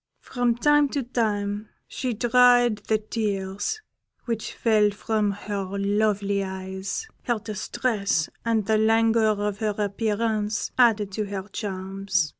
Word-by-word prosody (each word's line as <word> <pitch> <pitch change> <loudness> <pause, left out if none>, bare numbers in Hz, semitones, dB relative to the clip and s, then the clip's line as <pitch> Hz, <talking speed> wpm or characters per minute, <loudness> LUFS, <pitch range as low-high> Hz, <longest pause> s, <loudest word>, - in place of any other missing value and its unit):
From 245 -2 0
time 295 +3 +4
to 275 - 0
time 210 -3 -1 0.2
she 255 - -3
dried 245 0 +4
the 220 - +3
tears 210 - -3 0.4
which 230 -3 -3
fell 215 -2 +3
from 210 +1 -1
her 200 -1 -4
lovely 200 0 +1
eyes; 190 - -5 0.2
her 240 -3 +1
distress 210 -4 -1 0.2
and 225 -3 +1
the 215 +1 +2
languor 225 -1 +3
of 205 -1 -2
her 215 -2 -1
appearance 210 +1 -1
added 220 -5 +3
to 210 +2 -2
her 200 -1 -5
charms. 190 -3 -2
210 Hz, 125 wpm, -25 LUFS, 200-230 Hz, 0.4 s, time